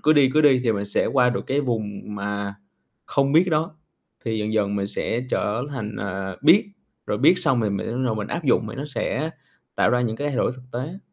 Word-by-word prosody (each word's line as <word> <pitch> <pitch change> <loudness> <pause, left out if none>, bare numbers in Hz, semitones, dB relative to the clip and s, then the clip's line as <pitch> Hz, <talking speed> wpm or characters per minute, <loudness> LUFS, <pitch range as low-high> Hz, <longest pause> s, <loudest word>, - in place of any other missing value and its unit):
cứ 155 - +5
đi, 140 -4 +5
cứ 155 - +5
đi 135 -4 +5
thì 115 - +3
mình 100 -1 -2
sẽ 100 - +1
qua 125 -2 +3
được 125 - -3
cái 140 +2 +1
vùng 110 -6 -3
mà 100 0 -3 0.5
không 140 0 +1
biết 170 +4 +5
đó. 155 0 0 0.5
Thì 110 -2 -1
dần 105 0 -2
dần 100 -2 +1
mình 100 -1 -1
sẽ 115 +3 -2
trở 110 +4 0
thành, 110 -7 -5
à, 95 -1 -4
biết, 170 +8 +6 0.4
rồi - - -1
biết 180 - +5
xong 135 -9 +2
thì 105 - +1
mình 100 - -1
mới 120 - -3
bắt 130 - -1
đầu 115 - 0
mình 105 -1 -3
áp 170 -1 -3
dụng 120 -4 +3
mà 110 - -6
nó 135 - -5
sẽ 150 +1 -2 0.5
tạo - - +3
ra 125 - +2
những 115 -2 -1
cái 145 +3 -2
thay 140 - -3
đổi 125 - +1
thực 130 - -12
tế. 145 +10 -4
125 Hz, 250 wpm, -23 LUFS, 105-145 Hz, 0.5 s, biết